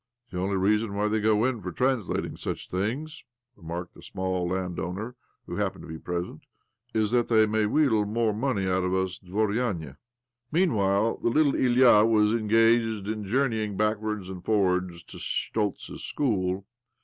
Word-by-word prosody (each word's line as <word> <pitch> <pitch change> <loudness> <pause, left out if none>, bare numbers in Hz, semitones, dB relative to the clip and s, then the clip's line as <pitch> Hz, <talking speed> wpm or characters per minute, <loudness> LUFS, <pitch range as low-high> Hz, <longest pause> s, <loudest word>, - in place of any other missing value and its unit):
" 120 0 -44
The 90 - -4
only 95 +2 0
reason 105 +2 +1
why, 105 +1 +1
they 110 +1 +1
go 110 +1 +3
in 130 -4 -1
for 90 - -5
trans 125 0 0
lating - - -3
such - - -5
things," 130 - -3 0.3
remarked 85 -1 -7
a - - -14
small 95 -1 -2
land 90 -1 -2
owner 100 +9 -4 0.3
who - - -6
happened - - -2
to - - -10
be 80 0 -7
present, 85 -2 -4 0.5
'■' - - +3
is 105 -1 +1
that 120 -1 +2
they 110 -2 +5
may 110 0 +1
w'heedle 110 -4 +2
more 110 0 +1
money 110 -3 -1
out 95 0 +1
of 90 +1 0
us 95 -1 -1
dvorianey 100 - -1
i - - -19 0.6
Meanwhile 110 - +2
the - - +2
little 145 +3 +3
Ilya 125 -4 +5
was 105 -2 +3
engaged 115 -1 +2
in 110 -1 -3
journeying 110 -3 0
backwards 105 -2 -1
and 95 -2 -8
forwards 90 -4 0
to - - -12
Schtoltz's 105 -2 -3
school. 95 -7 -1
105 Hz, 175 wpm, -27 LUFS, 95-115 Hz, 0.6 s, they